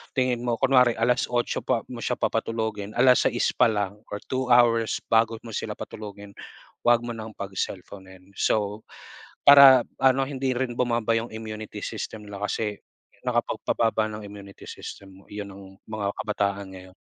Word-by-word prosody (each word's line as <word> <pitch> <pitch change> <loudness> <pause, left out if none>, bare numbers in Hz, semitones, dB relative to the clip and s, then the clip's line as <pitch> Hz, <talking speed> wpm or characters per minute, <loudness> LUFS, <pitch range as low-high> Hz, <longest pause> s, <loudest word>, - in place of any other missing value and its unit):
tingin 125 -2 0
mo, 120 - +1
kunwari 125 -1 +4
8:00 120 +1 0
pa - - -1
mo - - -6
siya - - -1
papatulugin, 110 -2 -2
6:00 125 -1 +4
pa - - +4
lang 105 -2 -2 0.2
or 105 - -8
two 130 0 -1
hours 120 -2 +3
bago 115 0 +3
mo 115 - -9
sila - - -4
patulugin, 100 -1 -9 0.6
huwag 120 0 +5
mo 120 - -4
nang 110 -2 -8
pagselponin. 95 -1 -7
So, 105 0 0 0.6
para 140 -2 +10 0.2
ano 135 0 +3
hindi 135 -2 -1
rin 125 -1 -2
bumaba 115 -2 +1
yung 115 0 -3
immunity 110 -1 -7
system 110 0 -6
nila 100 0 -6
kasi 105 0 -2 0.5
nakapagpababa 110 -1 0
ng 105 0 -7
immunity 100 -1 -12
system 95 -1 -10
mo - - -23
'yon 105 0 -6
ng 95 0 -13
mga 110 -2 -4
kabataan 100 -2 -2
ngayon. 95 0 -13
110 Hz, 150 wpm, -25 LUFS, 100-120 Hz, 0.6 s, para